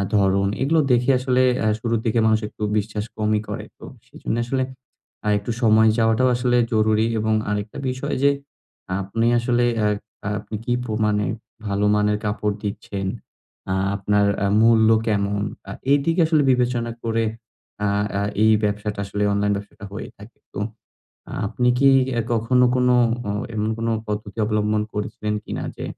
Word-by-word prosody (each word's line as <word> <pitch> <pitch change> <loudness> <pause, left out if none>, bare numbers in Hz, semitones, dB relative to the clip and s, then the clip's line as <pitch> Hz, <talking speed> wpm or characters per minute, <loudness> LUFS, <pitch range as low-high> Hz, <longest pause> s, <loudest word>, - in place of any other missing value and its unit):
ধরন 100 -1 +3
এগুলো 155 +5 +3
দেখে 125 +2 +3
আসলে 130 0 +2 0.2
আ - - +3
শুরুর 115 0 0
দিকে 115 0 +2
মানুষ 110 0 +3
একটু 105 - -8
বিশ্বাস 105 0 -2
কমই 110 0 +1
করে। - - -5
তো - - -16 0.2
সেজন্যে 120 - -3
আসলে 130 +2 0 0.6
আ - - -1
একটু 100 +4 -4
সময় 110 -1 +5
যাওয়াটাও 115 +2 +3
আসলে 125 0 +1 0.2
জরুরী 110 0 +3
এবং 110 +1 +1 0.2
আরেকটা 105 +4 -3
বিষয় 130 +3 -3
যে 140 - +6 0.7
আপনি 115 +4 -1
আসলে 120 0 +1 0.2
আ - - +4 0.4
আ - - -1
আপনি 110 - -7
কি 120 - +1
প্রমাণে 105 -2 0 0.4
ভালো 100 0 0
মানের 105 0 +2
কাপড় 105 0 -1
দিচ্ছেন, 100 -1 -4 0.6
আ - - +2 0.2
আপনার 100 +1 +2 0.2
আ - - +2 0.2
মূল্য 110 -1 +5 0.2
কেমন? 100 -1 0 0.3
আ - - -5 0.2
এদিকে 165 +5 +3
আসলে 155 -2 +3
বিবেচনা 120 -2 0
করে 115 0 0 0.6
আ - - +2 0.3
আ - - 0 0.2
এই 110 - +6
ব্যাবসাটা 105 0 -2
আসলে 100 +1 -2
অনলাইন 100 0 +1
ব্যাবসাটা 105 +1 -8
হয়ে 105 - -6
থাকে। 105 +4 -14 0.2
তো - - -5 0.9
আপনি 125 +4 0
কি 140 +1 +5 0.3
অ্যা 115 - +1
কখনো 120 +2 +3
কোন 125 0 +2 0.4
অ - - 0 0.2
এমন 110 0 -1
কোনো 115 0 -1 0.2
পদ্ধতি 105 0 -5
অবলম্বন 105 0 +1
করেছেন 105 0 -3
কি - - -8
না - - -4
যে, - - -6
110 Hz, 160 wpm, -22 LUFS, 105-120 Hz, 0.9 s, যে